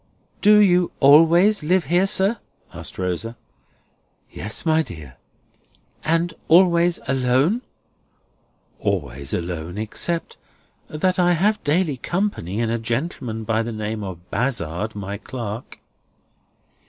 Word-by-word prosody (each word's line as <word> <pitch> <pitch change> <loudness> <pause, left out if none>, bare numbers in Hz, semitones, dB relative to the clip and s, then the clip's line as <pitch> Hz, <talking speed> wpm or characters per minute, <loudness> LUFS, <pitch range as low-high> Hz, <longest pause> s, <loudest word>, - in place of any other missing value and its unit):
"Do 210 +1 +6
you 180 -4 +4
always 165 +8 +6
live 180 +1 +2
here, 175 +6 +2
sir?" 195 +4 +1 0.3
asked - - -8
Rosa. 95 +6 -3 0.9
"Yes, 105 - -5
my 160 0 +3
dear." 75 - -9 0.9
"And 165 +1 0
always 170 0 +4
alone?" 130 - +2 1.2
"Always 70 +3 -3
alone; 85 +1 -4
except 165 +10 -3 0.5
that 185 +4 -1
I 175 0 +4
have 205 +6 +1
daily 155 -1 +1
company 170 - -2
in 115 -1 0
a 115 - -1
gentleman 120 -1 -3
by 110 +1 0
the 115 +1 -4
name 110 0 -4
of 90 -2 -9
Bazzard, 110 - -2
my 100 0 -5
clerk." 115 -2 -7
130 Hz, 115 wpm, -22 LUFS, 105-175 Hz, 1.2 s, Do